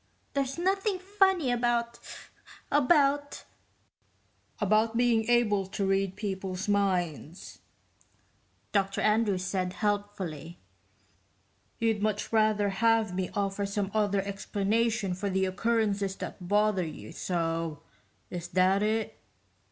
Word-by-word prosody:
"There's 275 0 -1
nothing 385 +3 +1
funny 380 -6 +2
about... 235 -1 0 0.7
about...." 285 0 +2 1.2
"About 215 +2 +2
being 235 -2 +2
able 210 -5 +3
to 195 +1 -2
read 195 -1 +1
people's 190 -2 -4
minds," 180 -5 -1 1.1
Dr 195 -1 0
Andrews 210 -3 +2
said 185 -1 -2
helpfully. 200 -6 -3 1.2
"You'd 225 -2 0
much 215 +1 -1
rather 215 -2 +3
have 225 0 +2
me 185 0 -2
offer 200 0 -1
some 200 0 -2
other 205 -2 +1
explanation 200 +1 -1
for 200 +3 -3
the 190 0 +1
occurrences 205 -1 0
that 180 -2 -7
bother 205 -1 +2
you 150 -10 -8
so 165 -3 -2 0.5
is 175 -1 -5
that 185 +2 +3
it?" 220 +1 -1
205 Hz, 105 wpm, -29 LUFS, 190-230 Hz, 1.2 s, able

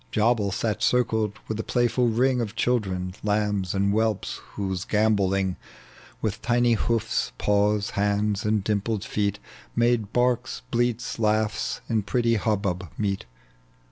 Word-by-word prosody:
Jabal 110 -2 +2
sat 105 +2 -1
circled 110 -4 +2
with 110 0 -3
a - - -1
playful 120 0 +1
ring 125 +2 +2
Of 110 -2 -4
children, 95 -7 0
lambs 105 -3 0
and 100 +1 +2
whelps, 110 -1 0
whose 95 -2 -2
gambolling, 100 -3 +1 0.7
With 105 -2 -2
tiny 120 0 +3
hoofs, 115 0 0
paws, 105 0 +2
hands, 105 0 0
and 105 -1 +1
dimpled 105 0 -1
feet. 100 -1 -1 0.4
Made 120 -3 +2
barks, 125 0 0
bleats, 120 -1 0
laughs, 110 0 0
in 110 -2 +1
pretty 115 +3 +1
hubbub 100 -5 -1
meet. 100 - -2
105 Hz, 130 wpm, -25 LUFS, 100-115 Hz, 0.7 s, tiny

